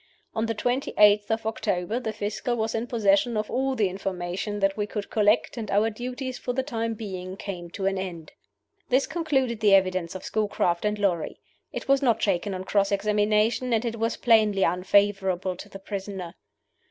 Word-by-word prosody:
On 220 +1 -1
the 225 - -1
twenty 245 +5 -1
eighth 210 0 +6
of 225 0 -1
October 220 -1 -1
the 225 -3 -3
Fiscal 215 +3 -2
was 220 -1 -1
in 230 +1 -2
possession 220 0 +2
of 215 0 -2
all 265 +1 0
the 210 -5 +2
information 190 +2 -3
that 195 0 +2
we 210 -1 -2
could 210 -1 -5
collect, 210 +3 +2
and 220 -3 -4
our 210 +3 +2
duties 250 +3 -5
for 245 - -3
the 265 +1 0
time 230 -4 -2
being 190 -3 -6
came 180 -4 -6
to 190 +3 -5
an 195 0 +1
end." 170 -4 -6 0.6
This 260 +2 +3
concluded 270 -8 0
the 205 -2 +6
evidence 185 -2 +1
of 185 - -7
Schoolcraft 205 -4 0
and 210 0 0
Lorrie. 185 -6 -1 0.3
It - - -6
was 275 0 +4
not 240 -5 +3
shaken 195 0 0
on 185 - -5
cross 200 +1 +1
examination, 210 +4 +2
and 225 +1 +1
it 230 -1 -3
was 230 +1 0
plainly 215 -4 +4
unfavorable 190 0 +2
to 205 - -10
the 195 - -9
prisoner. 195 -3 -6
210 Hz, 190 wpm, -26 LUFS, 195-230 Hz, 0.6 s, eighth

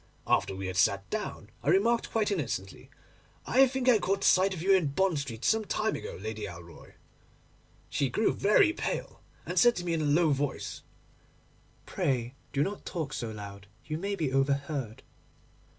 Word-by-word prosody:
After 95 - +1
we 95 0 -5
had 95 0 -4
sat 100 +1 +2
down, - - -4
I - - -1
remarked 230 +4 +3
quite 215 -2 0
innocently, 115 - -4 0.6
"I 265 +2 +5
think 260 0 -3
I 240 -4 +6
caught 195 +1 -1
sight 190 +1 +5
of 185 - -4
you 195 +1 +5
in 185 -5 +3
Bond 170 +2 +1
Street 120 -5 -5
some 220 0 +3
time 215 +1 -1
ago, - - -6
Lady 110 +1 -5
Alroy." 85 -3 -12 0.9
She 135 0 0
grew 220 - +1
very 210 +11 +4
pale, - - -4 0.2
and - - 0
said 240 -1 +6
to 175 - -4
me 170 - 0
in 160 - 0
a - - 0
low 155 +2 +3
voice, 140 0 -2 1.0
"Pray 125 -2 -1 0.2
do 140 - +1
not 200 +4 -4
talk 155 -5 -4
so 115 - -3
loud; 100 -2 -9 0.2
you 155 0 -3
may 200 +2 -2
be 155 -8 -2
overheard." 135 -3 -1
150 Hz, 175 wpm, -29 LUFS, -, 1.0 s, I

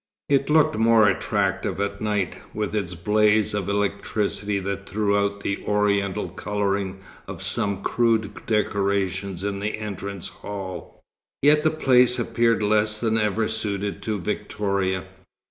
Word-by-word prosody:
It 140 0 +2
looked 150 -7 +4
more 115 -1 +5
attractive 95 -1 0
at 100 0 -2
night, 105 -4 -1
with 105 -1 -2
its 95 -4 -2
blaze 105 +4 +2
of 100 -2 -2
electricity 100 0 -1
that 100 0 -4
threw 100 0 +1
out 100 0 0
the 100 -1 -3
Oriental 100 -3 +1
colouring 100 0 -2 0.3
of - - -6
some 100 -1 +1
crude 115 -3 0
decorations 100 -3 0
in 100 -1 -2
the 105 +2 -2
entrance 100 -3 -5
hall, 95 -3 -8 0.4
yet 150 +1 +6
the 155 - +4
place 125 -5 +4
appeared 115 -1 +1
less 105 +1 +2
than 110 -1 +1
ever 105 +1 +1
suited 100 -2 -3
to 105 0 -2
Victoria. 95 +1 -2
100 Hz, 135 wpm, -24 LUFS, 100-110 Hz, 0.4 s, yet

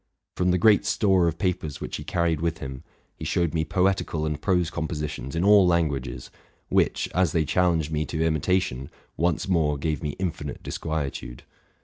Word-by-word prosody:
From 90 0 +1
the 90 - +3
great 105 +3 +5
store 95 -4 +3
of 85 0 -1
papers 90 -6 -2
which - - -5
he - - -7
carried 85 -3 0
with 85 -1 -1
him, 65 -3 -7 0.3
he - - -9
showed 85 -3 0
me 80 -1 +1
poetical 90 -2 0
and 75 -1 -3
prose 90 -4 +1
compositions 75 -3 -4
in 85 - 0
all 100 -2 +6
languages, 70 -8 -1 0.4
which, - - +2
as 90 -4 +2
they 80 -2 +2
challenged 85 -3 +1
me 75 0 0
to 80 0 -1
imitation, 80 -4 0 0.3
once 85 +1 0
more 80 -5 +2
gave 75 +2 -2
me 75 -2 -3
infinite 80 -6 -4
disquietude. 75 -6 -4
80 Hz, 170 wpm, -25 LUFS, 75-90 Hz, 0.4 s, all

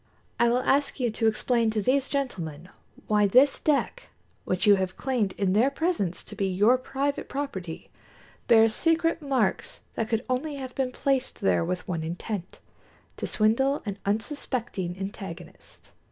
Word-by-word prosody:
I 235 - +4
will 250 +2 +1
ask 280 +1 +1
you 240 -3 +1
to 225 +1 0
explain 230 +1 +1
to 215 0 -1
these 260 +6 +1
gentlemen 180 - -3 0.4
why 210 -1 +3
this 260 +7 +5
deck, 310 - 0 0.4
which 185 0 0
you 205 - +8
have 190 -1 -3
claimed 240 -8 0
in 190 -2 0
their 230 +7 +4
presence 280 - -1
to 210 - -9
be 200 -1 0
your 205 +7 +3
private 275 +2 -2
property, 190 - -5 0.6
bears 225 -1 +6
secret 330 +4 +2
marks 275 - -1
that 225 0 -2
could 230 +1 -1
only 280 +4 -2
have 260 -2 -6
been 260 -2 -1
placed 265 0 -1
there 90 -3 +2
with 180 - -3
one 165 -3 -2
intent 175 +4 -5 0.6
to - - -3
swindle 265 +7 +2
an 200 -1 -4
unsuspecting 220 - -2
antagonist." 195 -3 -9
225 Hz, 155 wpm, -26 LUFS, 195-270 Hz, 0.6 s, you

